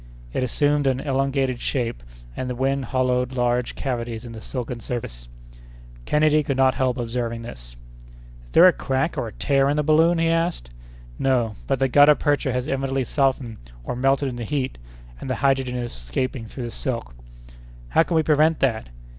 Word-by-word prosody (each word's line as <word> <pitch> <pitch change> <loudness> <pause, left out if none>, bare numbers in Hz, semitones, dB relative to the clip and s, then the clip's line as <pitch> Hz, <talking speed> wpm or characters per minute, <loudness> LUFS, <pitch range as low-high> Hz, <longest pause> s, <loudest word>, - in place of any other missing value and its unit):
It - - -1
assumed 145 +3 +1
an 130 -1 +1
elongated 135 -2 0
shape, 120 - -2 0.3
and 130 - -4
the 125 - -3
wind 135 +1 0
hollowed 125 0 0
large 120 -1 0
cavities 120 -3 -4
in 120 - -8
the 110 -1 -9
silken 125 0 -5
surface. - - -6 0.8
Kennedy 155 0 +3
could 140 -2 -2
not 130 -1 +4
help 130 0 0
observing 115 -1 -3
this. - - -10 0.7
"Is - - -20
there - - +8
a 185 - +7
crack 135 +4 -1
or 115 - -2
a - - -7
tear 135 +2 +1
in 145 - +1
the 150 - +1
balloon?" 160 +3 +4
he 165 0 +2
asked. 165 - -1 0.5
"No, 120 -5 +1
but 135 - +1
the 135 +1 +2
gutta 145 +3 +6
percha 145 -2 0
has 125 +1 -2
evidently 135 -1 -1
softened 130 -3 0 0.3
or 60 - -4
melted 135 +2 +2
in 125 -2 -4
the 120 - -4
heat, 130 - -3 0.4
and - - -7
the 130 - 0
hydrogen 135 -2 +1
is 120 -1 -3
escaping 115 - -4
through 125 +3 -7
the 120 - -5
silk." 115 - -4 0.8
"How - - +4
can 165 +1 0
we 160 - +4
prevent 155 +1 +3
that?" 115 - 0
130 Hz, 185 wpm, -23 LUFS, 120-140 Hz, 0.8 s, there